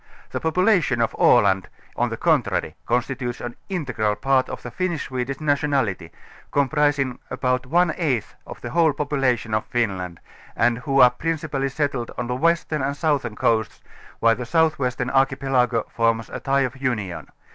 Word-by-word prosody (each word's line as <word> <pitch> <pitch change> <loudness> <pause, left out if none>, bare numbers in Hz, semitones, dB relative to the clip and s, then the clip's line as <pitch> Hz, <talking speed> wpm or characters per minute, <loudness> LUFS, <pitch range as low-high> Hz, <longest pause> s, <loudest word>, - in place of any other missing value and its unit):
The - - -2
population 175 - +2
of 115 - +1
Aland 95 -5 +4 0.3
on - - 0
the - - -4
contrary - - +1
consti 125 +3 0
tutes 120 -2 -4
an 120 0 -6
integral 125 - -1
part 135 +1 +1
of - - -7
the 120 - -7
Finnish 175 +1 -2
Swedish 130 +1 -3
nationality, 140 - 0 0.4
comprising 140 -2 +1
about 125 0 -1
one 170 +3 +3
eighth 135 - -1
of - - -9
the - - -6
whole 165 -3 +3
population 135 -7 0
of 110 - +1
Finland 95 -8 -2 0.4
and 115 0 +2
who 135 +2 +2
are 125 -1 +8
principallj' 150 -1 -2
settled 140 -6 -1
on 120 - -2
the 125 +1 -2
western 165 +1 +1
and 140 +2 -2
southern 145 -9 0
coasts, 110 0 0 0.4
while 115 0 +4
the 125 - -5
southwestern 130 -4 +1
archipelago 135 -4 +2
forms 115 -1 0
a - - -5
tie 135 +1 +1
of 130 0 -2
union. 105 -10 -3
130 Hz, 160 wpm, -23 LUFS, 120-145 Hz, 0.4 s, are